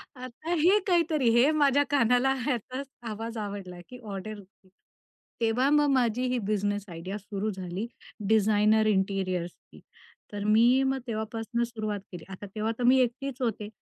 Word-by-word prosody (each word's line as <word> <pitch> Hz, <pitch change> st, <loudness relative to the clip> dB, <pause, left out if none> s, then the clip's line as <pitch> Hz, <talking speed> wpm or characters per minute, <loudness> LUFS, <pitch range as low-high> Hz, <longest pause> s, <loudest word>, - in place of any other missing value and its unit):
आता 255 Hz, +6 st, -7 dB
हे 385 Hz, +5 st, +6 dB
काहीतरी 325 Hz, -7 st, +2 dB
हे 250 Hz, +5 st, +5 dB
माझ्या 285 Hz, -2 st, +3 dB
कानाला 260 Hz, -1 st, +3 dB
ह्याचा 255 Hz, 0 st, -2 dB, 0.3 s
आवाज 225 Hz, +2 st, -5 dB
आवडला 200 Hz, -4 st, -6 dB
की 250 Hz, 0 st, -10 dB
ऑर्डर 205 Hz, +1 st, -6 dB
घे. 190 Hz, -1 st, -20 dB, 0.7 s
तेव्हा 235 Hz, +4 st, +2 dB
मग 295 Hz, 0 st, +4 dB
माझी 250 Hz, -2 st, +1 dB
ही 250 Hz, 0 st, 0 dB
बिझनेस 205 Hz, -1 st, -1 dB
आयडिया 180 Hz, +4 st, -6 dB
सुरु 205 Hz, +1 st, -4 dB
झाली 185 Hz, +3 st, -5 dB, 0.4 s
डिझाइनर 215 Hz, 0 st, +4 dB
इंटिरियर्सची. 190 Hz, -3 st, -2 dB, 0.5 s
तर 205 Hz, 0 st, -4 dB
मी 235 Hz, +5 st, +4 dB
मग 265 Hz, 0 st, 0 dB
तेव्हापासून 225 Hz, +1 st, -2 dB
सुरुवात 215 Hz, -3 st, -3 dB
केली. 175 Hz, -2 st, -8 dB
आता 190 Hz, +2 st, -8 dB
तेव्हा 215 Hz, +1 st, -1 dB
तर 245 Hz, -, -1 dB
मी 255 Hz, +2 st, +6 dB
एकटीच 260 Hz, +2 st, -2 dB
होती. 215 Hz, -3 st, -2 dB
225 Hz, 145 wpm, -28 LUFS, 205-255 Hz, 0.7 s, हे